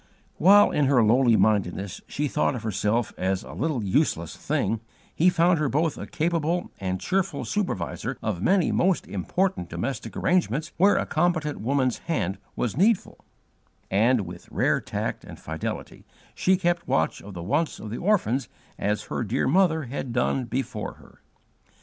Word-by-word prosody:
While, 200 Hz, +4 st, +6 dB
in 145 Hz, -, +2 dB
her 130 Hz, -3 st, +4 dB
lowly 120 Hz, +2 st, +4 dB
mindedness, 100 Hz, -3 st, +1 dB
she 150 Hz, +1 st, -2 dB
thought 145 Hz, -1 st, 0 dB
of 120 Hz, -, -6 dB
herself 110 Hz, +2 st, 0 dB
as 95 Hz, 0 st, 0 dB
a -, -, -10 dB
'little 140 Hz, -4 st, -1 dB
useless 95 Hz, -, 0 dB
thing,' 120 Hz, -7 st, -1 dB, 0.3 s
he 175 Hz, +3 st, +4 dB
found 175 Hz, -1 st, +3 dB
her 150 Hz, -3 st, +1 dB
both 155 Hz, +2 st, +1 dB
a -, -, -7 dB
capable 165 Hz, +1 st, -1 dB
and 95 Hz, -1 st, -2 dB
cheerful 190 Hz, -, -1 dB
supervisor 180 Hz, -, -2 dB
of 100 Hz, -5 st, -3 dB
many 190 Hz, -, +3 dB
most 185 Hz, -1 st, +2 dB
important 100 Hz, -, -1 dB
domestic 120 Hz, +11 st, -4 dB
arrangements 160 Hz, -4 st, +1 dB
where 200 Hz, +4 st, +5 dB
a -, -, +1 dB
competent 155 Hz, -2 st, 0 dB
woman's 130 Hz, +1 st, +1 dB
hand 105 Hz, -, -2 dB, 0.2 s
was 115 Hz, -3 st, -2 dB
needful: 200 Hz, -, +2 dB, 0.7 s
and, 115 Hz, +4 st, +3 dB
with 90 Hz, -2 st, -9 dB
rare -, -, +1 dB
tact -, -, -4 dB
and -, -, -11 dB
fidelity, 80 Hz, 0 st, -5 dB, 0.3 s
she 190 Hz, 0 st, +2 dB
kept 175 Hz, -1 st, 0 dB
watch 80 Hz, -, 0 dB
of 100 Hz, -1 st, -10 dB
the 85 Hz, -, -6 dB
wants 145 Hz, -, 0 dB
of 105 Hz, -, -7 dB
the 115 Hz, -, -3 dB
orphans 170 Hz, -, +1 dB, 0.3 s
as 105 Hz, +1 st, 0 dB
her -, -, -3 dB
dear 120 Hz, +5 st, 0 dB
mother 160 Hz, 0 st, +3 dB
had 130 Hz, 0 st, -5 dB
done 125 Hz, +1 st, 0 dB
before 130 Hz, +3 st, -3 dB
her. -, -, -20 dB
135 Hz, 160 wpm, -25 LUFS, 105-170 Hz, 0.7 s, While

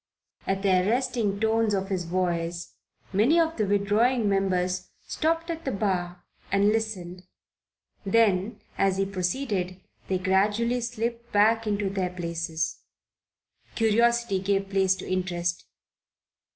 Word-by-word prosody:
At 195 Hz, +1 st, -1 dB
the 200 Hz, -, +3 dB
arresting 225 Hz, -1 st, 0 dB
tones 220 Hz, -1 st, +2 dB
of 195 Hz, 0 st, -2 dB
his 185 Hz, -3 st, -2 dB
voice 170 Hz, -1 st, -2 dB, 0.4 s
many 240 Hz, -, +4 dB
of 325 Hz, 0 st, +1 dB
the 215 Hz, -3 st, 0 dB
withdrawing 210 Hz, +4 st, +2 dB
members 185 Hz, -2 st, 0 dB, 0.2 s
stopped 330 Hz, +2 st, -1 dB
at 325 Hz, 0 st, -6 dB
the 265 Hz, -, -2 dB
bar 180 Hz, -4 st, -2 dB, 0.3 s
and 200 Hz, +1 st, +4 dB
listened, 200 Hz, -5 st, -2 dB, 0.8 s
then 205 Hz, 0 st, +2 dB, 0.2 s
as 195 Hz, -1 st, +2 dB
he 195 Hz, -, +1 dB
proceeded 185 Hz, -1 st, -2 dB, 0.3 s
they 190 Hz, -, 0 dB
gradually 205 Hz, +6 st, +1 dB
slipped 235 Hz, 0 st, -4 dB
back 220 Hz, +2 st, +3 dB
into 205 Hz, -1 st, 0 dB
their 190 Hz, -2 st, -1 dB
places. 170 Hz, -2 st, -3 dB, 1.0 s
Curiosity 235 Hz, -2 st, +2 dB
gave 195 Hz, 0 st, -1 dB
place 190 Hz, -1 st, +3 dB
to 185 Hz, -, -8 dB
interest. 175 Hz, -2 st, -2 dB
200 Hz, 125 wpm, -26 LUFS, 185-225 Hz, 1.0 s, many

